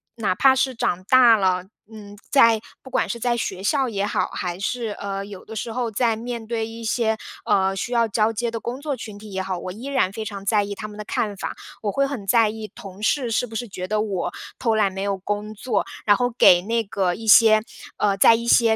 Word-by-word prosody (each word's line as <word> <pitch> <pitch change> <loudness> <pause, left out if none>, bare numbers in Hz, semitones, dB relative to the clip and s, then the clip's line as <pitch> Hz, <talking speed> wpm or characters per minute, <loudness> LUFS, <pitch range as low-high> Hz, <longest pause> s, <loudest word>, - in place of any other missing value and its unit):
哪 220 -5 0
怕 265 +4 +5
是 260 0 0
长 185 -5 -1
大 240 0 +6
了， 185 -2 +1 0.3
嗯， 205 -2 -11
在 230 -5 +5 0.2
不 265 - -11
管 - - 0
是 235 - -4
在 240 -1 +1
学 190 -4 -4
校 270 +4 +1
也 200 -4 -1
好， - - 0
还 180 0 -4
是， 235 +4 -2
呃， 195 0 -4
有 200 -2 -11
的 225 - -9
时 225 +1 -4
候 240 0 -2
在 225 +1 +1
面 235 -1 -5
对 225 -1 -2
一 230 +1 -9
些， 220 -1 0 0.3
呃， 190 0 +2
需 215 +6 -4
要 235 -1 +3
交 220 +1 +1
接 235 +2 -2
的 230 - -4
工 245 +4 -5
作 285 -3 -3
群 215 -2 -8
体 210 0 -11
也 190 0 -2
好， 185 -1 -3
我 185 - -6
依 225 +8 -9
然 270 -9 +1
非 220 +1 -6
常 200 -2 -7
在 205 0 +3
意 200 0 -5
他 215 +1 -7
们 210 - -11
的 210 - -7
看 205 -2 -2
法。 - - -5 0.3
我 205 - 0
会 275 +7 +1
很 245 -8 -5
在 225 -1 +4
意 215 0 -7
同 195 0 -11
事 245 +2 0
是 245 +2 0
不 225 - -11
是 235 0 -4
觉 185 -1 -6
得 210 +2 0
我 200 -4 -2 0.3
偷 230 -3 +1
懒， 205 -3 +2
没 195 - -5
有 200 -1 -1
工 205 +2 -4
作。 215 0 -1 0.2
然 205 -1 +5
后 245 0 +1
给 175 -7 +7
那 230 +2 0
个 190 -3 -1
一 225 - -9
些 215 0 +7 0.3
呃， 200 -1 +1
在 230 - +7
一 235 +1 -4
些 230 -1 +4
220 Hz, 260 characters per minute, -23 LUFS, 200-235 Hz, 0.3 s, 给